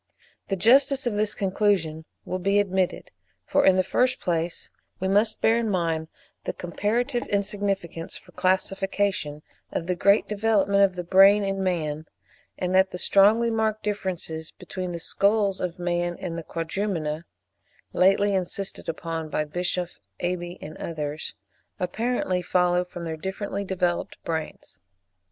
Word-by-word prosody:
The 195 - 0
justice 265 +7 +4
of 240 - 0
this 205 0 0
conclusion 185 -5 0 0.2
will 185 - -3
be 195 +3 +2
admitted: 190 -2 0 0.3
for - - +2
in 190 - +6
the 185 - +3
first 250 +7 +1
place, 170 -1 -2 0.3
we 190 - -1
must 210 +3 +2
bear 225 +1 +4
in 230 -2 -1
mind 165 -4 0 0.4
the - - -2
comparative 235 +8 -1
insignificance 195 -4 -2
for 180 - -17
classification 190 -4 0 0.3
of 165 - -2
the 180 - 0
great 200 +4 +3
development 205 -2 +3
of 190 -2 +3
the 180 - -3
brain 195 +3 +6
in 195 0 -1
man, 155 -4 -1 0.5
and 180 0 -1
that 190 0 +5
the - - -6
strongly 215 +6 +4
marked 220 -1 0
differences 180 -6 -3
between 185 -1 -6
the 170 - -4
skulls 200 +2 +1
of 180 -2 -3
man 175 0 -1
and 175 -3 -4
the 170 - -4
Quadrumana 165 -2 -3 0.7
(lately 195 +2 +4
insisted 190 0 -3
upon 165 -1 -4
by 150 - -1
Bischoff, 175 +2 -2 0.2
Aeby, 175 0 -3
and 155 +1 -8
others) 155 -1 -4 0.4
apparently 185 0 -1
follow 180 0 +2
from 175 -1 -8
their 160 -1 -4
differently 195 +3 -4
developed 180 -2 -1
brains. 160 - -5
185 Hz, 145 wpm, -25 LUFS, 170-200 Hz, 0.7 s, in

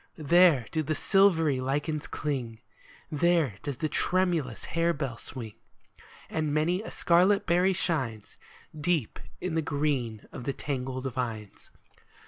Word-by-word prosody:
There 160 -4 +5
do 160 - 0
the 155 +1 -2
silvery 165 -10 +3
lichens 145 +3 -2
cling, 125 -7 -3 0.5
There 155 - +2
does 140 -3 -4
the 155 - -1
tremulous 170 -7 0
harebell 155 -7 -1
swing; 115 -5 -7 0.7
And 155 -2 -2
many 160 +5 +1
a - - -7
scarlet 190 +4 +3
berry 180 +2 +3
shines 130 - -2 0.4
Deep 155 -5 -1 0.2
in 180 - -3
the 160 - +1
green 140 -7 -1
of 120 - -8
the 140 - -1
tangled 130 -2 -4
vines. 110 -5 -5
150 Hz, 125 wpm, -28 LUFS, 130-170 Hz, 0.7 s, There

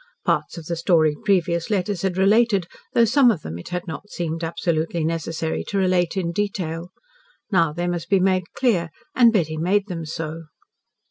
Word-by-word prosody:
Parts - - 0
of 165 - -8
the 170 - -2
story 160 -3 +3
previous 175 -4 +1
letters 200 -2 -1
had 190 -2 -1
related, 200 0 +3 0.3
though 235 - +6
some 250 +3 +5
of 185 -10 0
them 80 +2 -6
it - - -9
had 180 0 -3
not 185 +4 -7
seemed 165 -2 -4
absolutely 165 -1 -1
necessary 165 0 -2
to 200 - -3
relate 185 -1 +1
in 170 -3 -1
detail. 180 -4 -3 0.6
Now 170 -5 +3
they 175 +3 -3
must 175 -2 -3
be 195 - +4
made 185 -1 +2
clear, 190 -10 +2 0.2
and 240 -2 +6
Betty 160 -7 0
made 190 +5 +1
them 165 -3 -5
so. 160 +1 -5
175 Hz, 180 wpm, -22 LUFS, 165-195 Hz, 0.6 s, though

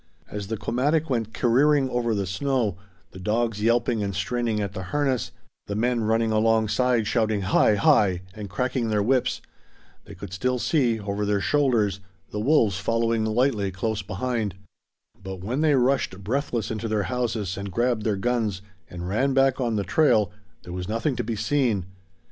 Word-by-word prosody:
As 105 -2 -5
the 110 +1 -3
komatik 145 +8 0
went 115 -3 -1
careering 135 +4 +3
over 120 -2 0
the 100 -1 -1
snow, 115 0 0 0.4
the 95 - -11
dogs 110 +2 -1
yelping 115 0 +2
and 100 -2 -2
straining 115 +2 -1
at 100 -2 -3
the 95 -2 -5
harness, 135 +1 0 0.4
the 100 - -3
men 120 +2 +1
running 115 +1 +2
alongside 115 +2 +2
shouting 110 -1 +1
Hi 100 +2 +3
hi 95 -2 +3
and 105 -2 -7
cracking 125 +3 -1
their 105 -1 +1
whips, 125 +3 +1 0.6
they - - -11
could 100 -2 -9
still 125 +6 0
see, 125 -4 +1
over 100 0 -3
their 100 -1 +1
shoulders, 115 -7 +1 0.3
the 105 - -3
wolves 110 - +3
following 115 0 +1
lightly 110 -2 +1
close 105 +3 -2
behind; 110 -1 -2 0.7
but 95 -1 -7
when 125 +8 -1
they 155 -2 +4
rushed 125 -7 +1
breathless 120 -1 -2
into 110 +1 -3
their 105 -2 0
houses, 115 -5 -2
and 100 0 -6
grabbed 120 +3 +1
their 105 -2 0
guns, 110 -3 -1 0.3
and 90 0 -6
ran 130 +8 +1
back 135 -1 +3
on 120 -3 0
the 100 - 0
trail, 105 - +3 0.3
there 90 - -8
was 90 +1 -5
nothing 115 +5 0
to 120 - -2
be 115 0 -3
seen. 110 -4 0
110 Hz, 170 wpm, -25 LUFS, 100-125 Hz, 0.7 s, they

